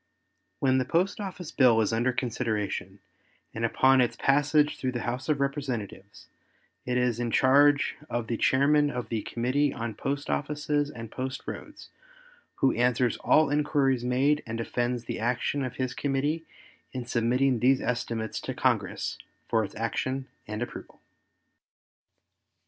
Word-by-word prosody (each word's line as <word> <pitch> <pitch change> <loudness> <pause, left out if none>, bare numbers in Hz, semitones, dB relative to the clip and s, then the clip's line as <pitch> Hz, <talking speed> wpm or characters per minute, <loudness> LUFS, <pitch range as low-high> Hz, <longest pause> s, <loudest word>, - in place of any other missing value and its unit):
When 130 -1 +3
the - - +1
post 180 - 0
office 185 -5 -6
bill 125 -4 +5
is 110 0 +1
under 120 +3 +2
consideration 115 -5 -3 0.5
and 115 - -4
upon 130 +3 +4
its 120 - +1
passage 145 +2 +2
through 130 -1 -2
the 120 - -3
House 125 +4 -3
of 150 -2 +2
Representatives 130 -8 -4 0.6
it 125 0 +1
is 125 -2 +1
in 120 -1 -1
charge 145 +4 +4
of 120 -1 -2
the 115 - -2
Chairman 145 +5 +3
of 125 -3 -5
the 115 -2 -1
Committee 130 +6 0
on 115 -3 -4
Post 140 +6 -3
Offices 150 0 -1
and 115 -5 -8
Post 130 +1 -4
Roads, - - -8 0.7
who 135 - +2
answers 125 0 +1
all 155 -2 +3
inquires 145 -4 +1
made 135 +4 +2
and 115 0 -4
defends 120 +1 -2
the - - -4
action 125 +4 0
of 125 -1 -4
his 130 -1 -2
committee 145 +4 -1 0.5
in 125 -2 -4
submitting 125 +2 +1
these 130 +3 +4
estimates 115 -3 -2
to - - -5
Congress - - 0 0.3
for 115 -1 +2
its 100 - -7
action 130 +4 -2 0.2
and 105 +2 -3
approval. - - -9
130 Hz, 150 wpm, -27 LUFS, 120-140 Hz, 0.7 s, bill